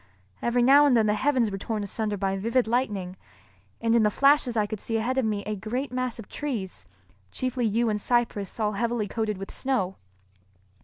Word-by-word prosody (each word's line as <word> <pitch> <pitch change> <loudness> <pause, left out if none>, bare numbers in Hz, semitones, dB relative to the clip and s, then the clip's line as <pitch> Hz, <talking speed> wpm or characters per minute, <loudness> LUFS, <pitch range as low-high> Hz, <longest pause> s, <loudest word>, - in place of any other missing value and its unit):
Every 240 +1 +2
now 285 +3 +7
and 250 -4 +4
then 220 - +3
the 210 - +2
heavens 250 -1 +1
were 195 - -4
torn 215 +1 -3
asunder 210 +1 -2
by 195 0 -1
vivid 230 +6 +1
lightning, 210 -6 -1 0.6
and 230 0 +1
in 235 - +5
the 210 - +4
flashes 275 0 +3
I 210 - +3
could 215 0 -5
see 225 +2 -1
ahead 250 +4 0
of 260 - +1
me 210 -2 -1
a 215 +1 -2
great 245 +8 -4
mass 255 -1 -2
of 225 - -9
trees, 235 -11 -5 0.4
chiefly 255 -2 -1
yew 230 +3 +1
and 210 -1 -1
cypress 235 -4 0
all 210 -1 +1
heavily 230 0 -1
coated 215 -1 -2
with 195 +1 -7
snow. 220 -9 -1
225 Hz, 200 wpm, -26 LUFS, 210-250 Hz, 0.6 s, now